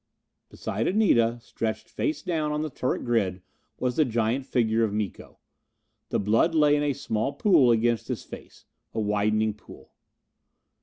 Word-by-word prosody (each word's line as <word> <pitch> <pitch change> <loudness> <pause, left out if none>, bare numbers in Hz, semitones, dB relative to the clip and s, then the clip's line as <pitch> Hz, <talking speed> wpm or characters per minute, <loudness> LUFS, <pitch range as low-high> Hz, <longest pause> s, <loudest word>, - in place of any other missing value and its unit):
Beside 110 +4 -3
Anita, 120 - +3
stretched 110 -2 -4
face 310 -1 -3
down 155 -4 -1
on 150 +1 -1
the 155 - -4
turret 130 - -2
grid, 100 -7 0 0.4
was 125 -1 -1
the 155 - +5
giant 120 +1 -1
figure 115 -3 +1
of 110 - 0
Miko. 105 -2 -5 0.7
The - - 0
blood 115 - +2
lay 150 -2 +5
in 145 - +1
a 145 -1 +1
small 110 +2 -2
pool 180 - +4
against 115 -1 +2
his - - -4
face. - - -12 0.3
A - - 0
widening 105 +1 +1
pool. 105 - -16
115 Hz, 155 wpm, -26 LUFS, 110-150 Hz, 0.7 s, the